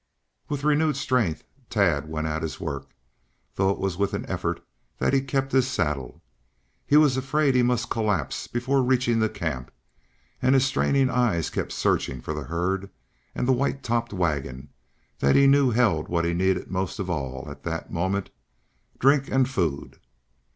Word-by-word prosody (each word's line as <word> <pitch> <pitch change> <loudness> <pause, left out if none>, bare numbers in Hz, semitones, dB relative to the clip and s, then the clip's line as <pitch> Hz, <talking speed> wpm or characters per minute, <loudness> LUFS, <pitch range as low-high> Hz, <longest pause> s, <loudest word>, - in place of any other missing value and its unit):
With 145 -1 -3
renewed 150 0 +2
strength, 125 - 0 0.3
Tad 85 -8 +1
went 80 0 -3
at 80 0 -2
his 80 -2 -4
work, 70 -1 -5 0.6
though 95 0 +1
it 100 - 0
was 95 -3 -2
with 100 +1 0
an - - -4
effort - - -3 0.3
that - - +1
he 135 - +4
kept 135 0 -1
his 130 -1 +3
saddle. 75 - -2 0.6
He 145 - +5
was 145 -4 +5
afraid 140 +1 +1
he 125 - +4
must 120 -1 0
collapse 105 -7 -1
before 130 +3 0
reaching 125 -2 +2
the 110 0 +2
camp, 65 -10 -4 0.7
and 130 +1 +4
his 135 0 +4
straining 135 0 +2
eyes 115 - +1
kept - - -3
searching 65 - 0
for 75 - -5
the 75 -2 -5
herd 90 +5 -2 0.5
and 125 - -1
the 130 - +5
white 135 +2 -1
topped 115 0 -1
wagon 70 -7 -2 0.5
that 70 - +3
he 140 - +6
knew 140 -1 +5
held 110 -10 +2
what 85 -1 0
he 85 - 0
needed 95 +1 0
most 95 0 -2
of 100 -3 -3
all 70 -5 -4
at 70 -1 -9
that 80 +1 -5
moment 95 +3 -1 0.7
drink 140 +1 +3
and 130 -1 +2
food! 80 - -2
100 Hz, 170 wpm, -25 LUFS, 80-130 Hz, 0.7 s, he